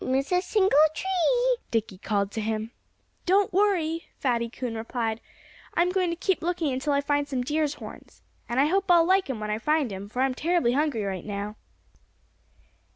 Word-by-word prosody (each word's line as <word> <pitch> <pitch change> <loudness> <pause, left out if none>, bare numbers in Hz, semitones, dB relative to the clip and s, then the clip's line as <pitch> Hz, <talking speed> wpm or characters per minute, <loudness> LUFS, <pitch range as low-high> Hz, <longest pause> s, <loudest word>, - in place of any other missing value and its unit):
"Don't 255 - -2
miss 270 +4 0
a 360 0 +3
single 385 +1 +2 0.2
tree!" 485 +7 +1
Dickie 220 -4 -2
called 200 0 -1
to 220 - -3
him. 220 +1 -2 0.6
"Don't 390 +1 +3
worry!" 345 -5 +1
Fatty 235 -3 0
Coon 245 0 -5
replied. 225 0 -3 0.5
"I'm 350 +1 +3
going 365 -2 +1
to 335 - -1
keep 375 +1 0
looking 335 -4 -1
until 265 +3 -1
I 280 0 +2
find 290 0 0
some 260 -3 -2
deer's 300 +2 0
horns. - - -12 0.3
And 240 +2 0
I 280 - +5
hope 385 +5 +1
I'll 340 -2 +6
like 375 -2 +2
'em 250 -5 -3
when 210 0 -3
I 210 - -1
find 300 -4 +1
'em, 195 +1 -7
for 250 +4 0
I'm 265 -1 +1
terribly 325 -3 +1
hungry 280 -4 0
right 190 -3 -3
now." 205 0 -5
285 Hz, 190 wpm, -26 LUFS, 225-350 Hz, 0.6 s, I'll